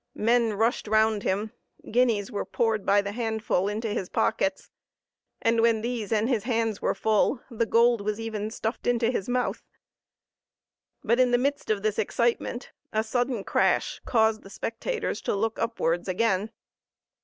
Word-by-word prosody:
Men 230 Hz, 0 st, +2 dB
rushed 225 Hz, +2 st, 0 dB
round 220 Hz, 0 st, +3 dB
him; 205 Hz, +2 st, -1 dB, 0.4 s
guineas 230 Hz, -4 st, +2 dB
were 205 Hz, -, -2 dB
poured 225 Hz, -3 st, -1 dB
by 200 Hz, 0 st, +4 dB
the 200 Hz, -, -4 dB
handful 220 Hz, -4 st, -1 dB
into 215 Hz, +2 st, -2 dB
his 190 Hz, -3 st, -3 dB
pockets; 190 Hz, 0 st, 0 dB, 0.7 s
and 230 Hz, 0 st, +3 dB
when 230 Hz, -1 st, +3 dB
these 230 Hz, -2 st, -3 dB
and 220 Hz, 0 st, +2 dB
his 235 Hz, -5 st, 0 dB
hands 225 Hz, -4 st, 0 dB
were -, -, 0 dB
full, 220 Hz, +4 st, +1 dB
the 230 Hz, 0 st, -1 dB
gold 235 Hz, -1 st, +4 dB
was 210 Hz, +1 st, -2 dB
even 220 Hz, -2 st, -3 dB
stuffed 220 Hz, +1 st, -4 dB
into 240 Hz, -1 st, +2 dB
his 220 Hz, -3 st, -3 dB
mouth. 250 Hz, 0 st, -1 dB, 1.4 s
But, 235 Hz, +2 st, +2 dB
in 255 Hz, -1 st, +5 dB
the 245 Hz, -, +3 dB
midst 280 Hz, +3 st, -1 dB
of 210 Hz, -2 st, 0 dB
this 215 Hz, -1 st, 0 dB
excitement, 235 Hz, +2 st, -1 dB, 0.2 s
a 220 Hz, 0 st, +1 dB
sudden 245 Hz, -1 st, -1 dB
crash -, -, +1 dB
caused 220 Hz, -2 st, +2 dB
the 195 Hz, -, -13 dB
spectators 230 Hz, -, -3 dB
to -, -, -1 dB
look 225 Hz, +2 st, -1 dB
upwards 175 Hz, -7 st, -1 dB
again. 195 Hz, +1 st, +1 dB
225 Hz, 160 wpm, -26 LUFS, 210-235 Hz, 1.4 s, in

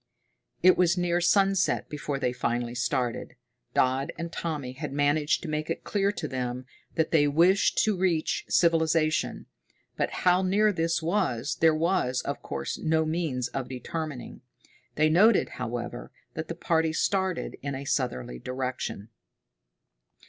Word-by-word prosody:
It 185 Hz, 0 st, +6 dB
was 180 Hz, 0 st, +3 dB
near 175 Hz, 0 st, +1 dB
sunset 195 Hz, +1 st, +2 dB
before 145 Hz, -1 st, -4 dB
they 125 Hz, -2 st, -1 dB
finally 120 Hz, -1 st, -2 dB
started. 125 Hz, 0 st, -2 dB, 0.4 s
Dodd 130 Hz, +2 st, +2 dB
and 170 Hz, 0 st, -5 dB
Tommy 150 Hz, -8 st, -4 dB
had 135 Hz, -, -6 dB
managed 145 Hz, +2 st, +1 dB
to -, -, -5 dB
make 155 Hz, 0 st, -3 dB
it 165 Hz, -, -3 dB
clear 200 Hz, -1 st, +1 dB
to 160 Hz, -, -4 dB
them 125 Hz, -1 st, -4 dB, 0.3 s
that 160 Hz, -1 st, 0 dB
they 145 Hz, -3 st, +4 dB
wished 175 Hz, +7 st, +3 dB
to 215 Hz, -2 st, +2 dB
reach 180 Hz, -4 st, 0 dB
civilization, 165 Hz, -1 st, +2 dB, 0.5 s
but -, -, 0 dB, 0.2 s
how 180 Hz, 0 st, +5 dB
near 205 Hz, +3 st, +3 dB
this 165 Hz, -1 st, 0 dB
was 160 Hz, -, 0 dB
there 160 Hz, -1 st, +4 dB
was, 155 Hz, -6 st, 0 dB
of 140 Hz, -, -4 dB
course, 70 Hz, -1 st, -4 dB
no 160 Hz, 0 st, +1 dB
means 155 Hz, -7 st, -1 dB
of 135 Hz, -2 st, -4 dB
determining. 140 Hz, +1 st, -6 dB, 0.5 s
They 155 Hz, +1 st, +3 dB
noted, 195 Hz, +7 st, +4 dB
however, 120 Hz, 0 st, -5 dB, 0.2 s
that 160 Hz, +4 st, -5 dB
the 170 Hz, -, -5 dB
party 160 Hz, -1 st, +1 dB
started 190 Hz, +1 st, -1 dB
in 140 Hz, -1 st, -3 dB
a 135 Hz, +1 st, -6 dB
southerly 65 Hz, -, -2 dB
direction. 125 Hz, -, -4 dB
155 Hz, 145 wpm, -27 LUFS, 130-175 Hz, 0.5 s, It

